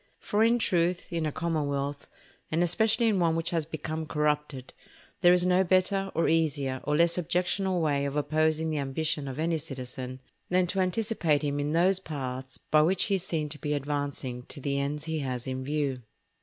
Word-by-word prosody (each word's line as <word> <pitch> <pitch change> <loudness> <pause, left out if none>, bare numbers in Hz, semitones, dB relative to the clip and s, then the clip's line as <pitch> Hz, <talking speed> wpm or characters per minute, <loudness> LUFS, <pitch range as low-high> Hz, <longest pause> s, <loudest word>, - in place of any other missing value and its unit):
For 210 +2 +1
in 230 +1 +4
truth, 175 -4 0
in 165 -2 0
a - - -2
commonwealth, 145 -3 -2 0.4
and 165 +2 +1
especially 220 +6 +2
in 210 -4 +2
one 165 -2 +2
which 165 0 -1
has 165 -3 0
become 155 0 -4
corrupted, 150 -3 -1 0.5
there 175 -2 +7
is 180 0 +4
no 180 +1 +4
better, 190 +1 +2
or 165 - +2
easier, 145 -5 +1
or 150 - +1
less 170 +2 +3
objectionable 180 +2 0
way 145 -3 +1
of 140 0 -3
opposing 155 +2 +1
the 155 - -1
ambition 145 +1 -1
of 135 0 -5
any 165 +1 0
citizen, 130 -3 -6 0.3
than 180 0 +3
to 190 +2 -2
anticipate 185 -6 +1
him 145 0 -1
in 145 +1 -1
those 185 +3 +3
paths 130 -6 -5
by 155 - +6
which 180 +4 +3
he 200 - 0
is 180 - -3
seen 155 -4 -1
to 150 - -9
be 150 +2 -2
advancing 140 -3 -3
to - - -7
the 140 0 -1
ends 145 +2 -2
he 160 -1 -2
has 125 -3 -3
in 130 0 -3
view. 140 -2 -1
155 Hz, 195 wpm, -28 LUFS, 140-175 Hz, 0.5 s, there